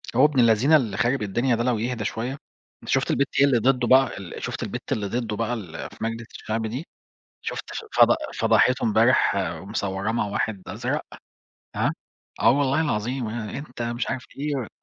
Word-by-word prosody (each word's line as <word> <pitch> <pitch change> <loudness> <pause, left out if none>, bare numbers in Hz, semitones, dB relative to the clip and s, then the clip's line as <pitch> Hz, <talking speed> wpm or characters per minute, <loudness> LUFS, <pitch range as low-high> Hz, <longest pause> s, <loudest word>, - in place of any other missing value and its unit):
هو 130 - +6
ابن 150 -4 +2
اللذينة 115 +6 +5
اللي 115 -10 +1
خارب 120 +3 +1
الدنيا 120 +5 +1
ده 115 - -1
لو 125 -2 +1
يهدى 120 -1 -2
شوية، 115 +4 -2 0.5
أنت - - -10
شُفت - - +2
البت 140 - +2
هي 140 - +7
اللي 135 -4 +3
ضده 125 0 +2
بقى 130 -4 +4
ال 95 -3 -8
شُفت - - -3
البت - - -6
اللي 105 -2 0
ضده 115 -1 -2
بقى 115 +2 -1
اللي 90 -9 -6
في - - -15
مجلس 115 0 -3
الشعب 110 +1 -3
دي؟ 130 +9 -5 0.6
شُفت - - -3
ف - - -6
فض - - +7 0.2
فضحته 125 +1 +3
امبارح 110 0 +4
ومصوّراه 95 +3 -2
مع 115 -1 0
واحد 100 0 -2
أزرق؟ - - -2 0.8
هاه، - - +2 0.5
آه - - +6
والله 140 +2 +2
العظيم، 125 -3 -1
آآ 110 0 -4
أنت 130 -4 -7
مش 120 +1 -2
عارف 130 0 -3
إيه، 150 +1 -2
يا 130 -6 -2
120 Hz, 190 wpm, -24 LUFS, 110-130 Hz, 0.8 s, هي